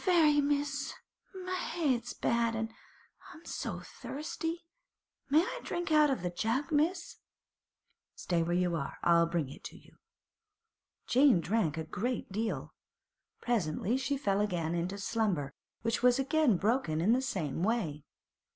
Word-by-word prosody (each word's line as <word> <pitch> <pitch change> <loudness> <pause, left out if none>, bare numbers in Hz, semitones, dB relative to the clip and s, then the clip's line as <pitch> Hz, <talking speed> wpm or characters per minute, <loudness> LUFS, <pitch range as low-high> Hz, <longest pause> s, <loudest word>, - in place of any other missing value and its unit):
'Not 365 -2 +3
very, 300 -3 +5
miss. 285 -1 -1 0.5
My 370 - -3
head's 275 -10 -1
bad, 235 -1 +1
an' 225 0 -3 0.6
I'm 325 - -14
so - - -4
thirsty. 325 +3 -5 0.6
May 300 +3 +6
I - - -4
drink 350 -1 -3
out 305 -1 +6
of 265 -9 -1
the 180 - -1
jug, 230 - -1
miss?' 335 +4 0 1.0
'Stay 170 -2 0
where 170 +1 0
you 180 -1 +1
are. 140 -4 -4
I'll 170 -1 +5
bring 165 -4 -1
it - - -12
to - - -8
you.' - - -20 1.1
Jane 260 -6 +5
drank 170 -3 0
a 160 - -2
great 220 +8 -3
deal. 220 +3 -3 0.7
Presently 215 -1 0
she 270 +2 -1
fell 200 -6 +1
again 175 -5 -1
into 175 +3 -2
slumber, 200 -10 -1 0.3
which 230 0 0
was 250 0 +5
again 275 - +3
broken 200 -6 +1
in 195 +8 +4
the 255 - +2
same 185 - -2
way. 180 -9 0
230 Hz, 150 wpm, -31 LUFS, 175-285 Hz, 1.1 s, May